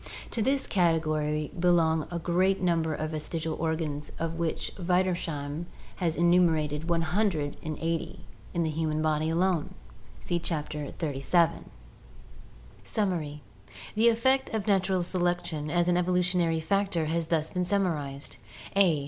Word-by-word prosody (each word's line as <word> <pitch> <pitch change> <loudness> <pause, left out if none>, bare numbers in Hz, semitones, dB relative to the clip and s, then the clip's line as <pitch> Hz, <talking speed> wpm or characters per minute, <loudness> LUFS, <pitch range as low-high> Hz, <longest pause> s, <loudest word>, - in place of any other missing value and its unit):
To 230 - -1
this 270 +4 +1
category 155 -4 +1
belong 165 -3 +3
the 175 - -3
great 185 +3 +2
number 165 -3 +1
of 155 +1 -3
vestigial 160 +1 -3
organs 160 -3 -2
of 165 0 -2
which 165 -2 -1
Wiedersheim 170 -4 -1 0.3
has 170 -3 0
enumerated 165 -3 +3
180 165 -1 -1 0.3
in 170 - 0
the 160 - 0
human 155 0 -1
body 155 0 +1
alone! 170 -1 +1 0.4
(See 175 - -1
Chapter 150 -3 -2
XXXVII.) 160 +2 +1 1.2
Summary. 165 -8 -2 0.3
— - - -13
The 225 +2 +5
effect 260 +4 +2
of 210 -3 -1
natural 190 -3 +2
selection 175 -4 -1
as 175 +2 +2
an 175 0 +3
evolutionary 180 -2 +2
factor 195 -1 +1
has 165 +1 -1
thus 160 -1 0
been 180 - 0
summarized: 155 -9 -1 0.4
a. 180 -6 +4
165 Hz, 125 wpm, -28 LUFS, 155-180 Hz, 1.2 s, The